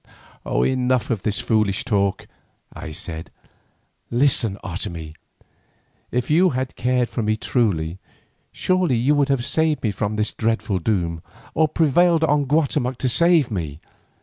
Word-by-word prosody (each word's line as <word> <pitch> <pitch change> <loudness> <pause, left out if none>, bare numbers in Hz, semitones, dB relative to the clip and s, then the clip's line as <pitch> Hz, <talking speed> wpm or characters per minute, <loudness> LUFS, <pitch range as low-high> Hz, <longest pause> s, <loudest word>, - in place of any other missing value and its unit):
"Enough 130 -1 +1
of 110 -5 -1
this 105 +2 -1
foolish 110 -5 +1
talk," 100 -4 0 0.5
I 80 - -8
said. 80 0 -7 0.8
"Listen, 120 -5 +2
Otomie; 85 -4 -5 1.0
if 125 +3 -2
you 180 +4 +5
had 130 0 -3
cared 125 -1 +1
for 120 - -4
me 110 0 0
truly, 95 -8 -1 0.5
surely 185 -7 +1
you 130 +6 +2
would 145 -1 +2
have 135 -3 0
saved 160 -1 +1
me 110 - +1
from 105 +1 -3
this 105 0 -1
dreadful 110 -3 -1
doom, 85 -4 -1 0.3
or 160 0 +3
prevailed 165 +2 +3
on 145 -2 +2
Guatemoc 140 -3 0
to 130 - -1
save 165 0 +4
me. 80 -7 -4
120 Hz, 140 wpm, -22 LUFS, 100-145 Hz, 1.0 s, you